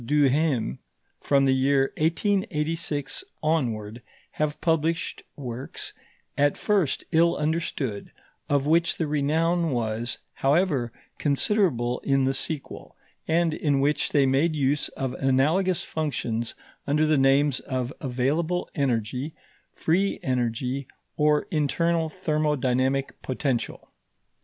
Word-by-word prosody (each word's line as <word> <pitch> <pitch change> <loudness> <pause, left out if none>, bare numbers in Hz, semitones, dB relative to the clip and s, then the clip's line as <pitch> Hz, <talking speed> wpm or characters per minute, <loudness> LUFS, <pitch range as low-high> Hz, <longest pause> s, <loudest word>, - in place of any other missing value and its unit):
Duhem, 140 - +2 0.4
from 140 -1 +3
the 135 - +4
year 135 +1 +2
1886 160 - 0 0.2
onward, 120 -8 -1 0.3
have 150 0 -2
published 165 -1 0
works, 130 -2 -6 0.4
at 145 0 +2
first 200 -9 +1
ill 170 +1 +4
understood, 150 -8 -2 0.4
of 140 -1 +2
which 165 +3 +2
the 165 - 0
renown 160 +4 +1
was, 120 -1 -2 0.2
however, 140 -4 +2 0.3
considerable 140 - +1
in 135 -1 +1
the 135 +1 +2
sequel, 145 +1 -4 0.3
and 165 0 +2
in 145 -3 +1
which 145 +2 +1
they 140 -2 +4
made 140 +5 +2
use 145 0 +1
of 130 -2 -2
analogous 155 +8 +2
functions 120 -7 -2 0.3
under 150 +2 +3
the 155 0 +3
names 135 0 +3
of 130 0 -3
available 150 +7 0
energy, 130 +1 -1 0.4
free 190 +5 +1
energy, 125 +1 -1 0.3
or 150 +2 +3
internal 165 +1 +1
thermodynamic 140 -6 0
potential. 130 -2 -2
145 Hz, 110 wpm, -26 LUFS, 130-160 Hz, 0.4 s, the